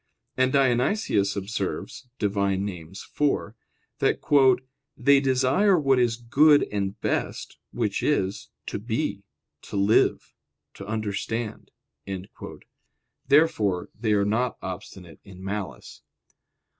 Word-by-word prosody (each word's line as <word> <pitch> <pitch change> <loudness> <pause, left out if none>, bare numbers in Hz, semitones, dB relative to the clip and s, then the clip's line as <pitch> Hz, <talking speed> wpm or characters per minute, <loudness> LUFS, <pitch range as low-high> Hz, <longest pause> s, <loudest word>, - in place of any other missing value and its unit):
And 130 0 +2
Dionysius 130 - +2
observes 100 +5 -4
(Div. 105 -1 -1
Nom. 100 0 0
iv), 90 -1 -8 1.0
that - - +1 0.8
"they 140 0 +5
desire 135 +9 +3
what 135 -3 +3
is 120 -2 +1
good 145 +5 +4
and 100 +1 -3
best, - - -3
which 110 -4 -1
is, 100 -10 -1 0.2
to - - -4
be, - - -2 0.4
to - - -9
live, 100 +2 +2 0.4
to 100 - -10
understand." 110 +1 -3 1.6
Therefore 120 - +2
they 110 -1 -1
are 100 -1 +2
not 115 +4 0
obstinate 95 -2 -8
in 95 -1 -13
malice. 100 -1 -6
110 Hz, 105 wpm, -25 LUFS, 100-130 Hz, 1.6 s, they